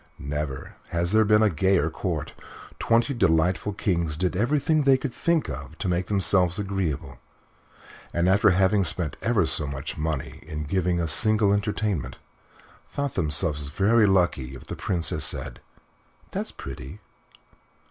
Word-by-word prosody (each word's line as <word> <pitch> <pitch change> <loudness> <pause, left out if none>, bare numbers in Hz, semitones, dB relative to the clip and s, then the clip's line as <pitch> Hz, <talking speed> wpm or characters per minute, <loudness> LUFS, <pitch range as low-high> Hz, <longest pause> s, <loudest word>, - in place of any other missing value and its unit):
Never 70 -1 -5
has 85 +1 -1
there 110 +1 +5
been 105 +1 +4
a 110 - +4
gayer 85 -2 +2
Court. 80 -3 -3 0.5
Twenty 115 +3 +2
delightful 90 -2 +2
kings 85 -6 -1
did 90 +1 0
everything 150 - +2
they 135 -2 +5
could 130 -2 -5
think 170 -2 +1
of 70 +3 -7
to - - -3
make 90 0 0
themselves 95 -3 +2
agreeable, 95 - -3 0.9
and 85 +1 +1
after 100 +2 +5
having 95 +2 +3
spent 85 -3 -2
ever - - +2
so 75 - -1
much 70 +1 -5
money 75 -3 -3
in 75 0 -6
giving 90 +2 0
a 85 - 0
single 110 +2 +3
entertainment 105 - -2 0.7
thought 140 -2 -3
themselves 75 -3 +1
very 105 +8 +3
lucky 85 -9 +1
if 65 - -11
the - - -6
Princess 85 -4 -2
said - - -3 0.7
"That's - - -3
pretty." 70 +11 -9
90 Hz, 145 wpm, -25 LUFS, 80-105 Hz, 0.9 s, there